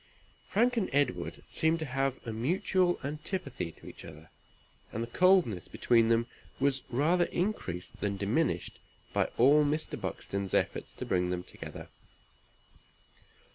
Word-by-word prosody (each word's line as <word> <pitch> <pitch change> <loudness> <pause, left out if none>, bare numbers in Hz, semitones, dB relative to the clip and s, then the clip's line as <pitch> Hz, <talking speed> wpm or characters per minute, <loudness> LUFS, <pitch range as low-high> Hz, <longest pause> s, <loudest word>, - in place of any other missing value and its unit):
Frank 240 +4 +3
and 205 - +1
Edward 145 +1 0
seemed 160 +1 +2
to 160 - -3
have 135 0 -1
a 115 - -3
mutual 175 - +1
antipathy 145 - -3
to - - -18
each - - -10
other, 80 +1 -11 0.6
and 115 - -2
the - - -4
coldness 175 - +3
between 115 -2 +3
them 115 0 +3 0.3
was 135 -1 +2
rather 165 +8 +3
increased 135 - -3
than 100 -1 -1
diminished 110 +11 0 0.3
by - - +3
all 145 +5 +6
Mr. 150 +2 -1
Buxton's 100 -1 -3
efforts - - 0
to - - -6
bring 90 -1 +1
them 90 0 -2
together. - - -9
135 Hz, 135 wpm, -31 LUFS, 110-165 Hz, 0.6 s, all